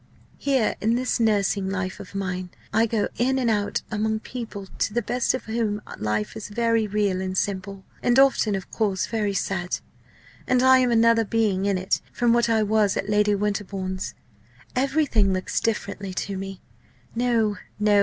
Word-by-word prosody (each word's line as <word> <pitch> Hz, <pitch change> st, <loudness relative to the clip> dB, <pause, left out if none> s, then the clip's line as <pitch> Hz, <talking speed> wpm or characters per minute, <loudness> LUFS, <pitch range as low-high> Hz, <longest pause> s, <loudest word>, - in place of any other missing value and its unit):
"Here 270 Hz, -5 st, +1 dB
in 225 Hz, +2 st, +2 dB
this 250 Hz, 0 st, 0 dB
nursing 205 Hz, -3 st, +2 dB
life 185 Hz, -1 st, -3 dB
of 195 Hz, 0 st, -10 dB
mine, 185 Hz, -2 st, -3 dB, 0.2 s
I 225 Hz, +2 st, +4 dB
go 215 Hz, -2 st, 0 dB
in 260 Hz, +2 st, +2 dB
and 245 Hz, -3 st, +2 dB
out 205 Hz, -1 st, 0 dB
among 220 Hz, 0 st, 0 dB
people 225 Hz, -6 st, -6 dB
to 205 Hz, -, 0 dB
the 240 Hz, -, +1 dB
best 245 Hz, +3 st, +1 dB
of 255 Hz, -, -6 dB
whom 220 Hz, -2 st, -1 dB, 0.2 s
life 105 Hz, 0 st, -1 dB
is 215 Hz, -, -6 dB
very 230 Hz, 0 st, +1 dB
real 200 Hz, -2 st, 0 dB
and 190 Hz, 0 st, -3 dB
simple 195 Hz, 0 st, -3 dB, 0.2 s
and 245 Hz, 0 st, +3 dB
often, 265 Hz, -6 st, +4 dB
of 190 Hz, -, -6 dB
course, 200 Hz, -4 st, 0 dB
very 210 Hz, -3 st, -1 dB
sad. 180 Hz, -2 st, -1 dB, 0.7 s
And 255 Hz, 0 st, +3 dB
I 260 Hz, 0 st, +7 dB
am 250 Hz, -1 st, +3 dB
another 230 Hz, 0 st, +4 dB
being 205 Hz, -3 st, +1 dB
in 200 Hz, -2 st, +2 dB
it 185 Hz, +1 st, 0 dB
from 240 Hz, -1 st, +2 dB
what 235 Hz, 0 st, +3 dB
I 220 Hz, -1 st, +3 dB
was 210 Hz, -1 st, +2 dB
at 200 Hz, -, -2 dB
Lady 210 Hz, 0 st, +3 dB
Winterbourne's. 195 Hz, -2 st, -3 dB, 0.6 s
Everything 265 Hz, -7 st, +2 dB
looks 185 Hz, 0 st, -1 dB
differently 200 Hz, -3 st, -2 dB
to 195 Hz, +1 st, -3 dB
me. 195 Hz, 0 st, -6 dB, 0.5 s
No, 230 Hz, -3 st, +1 dB, 0.2 s
no! 210 Hz, -1 st, +4 dB
210 Hz, 175 wpm, -24 LUFS, 195-230 Hz, 0.7 s, I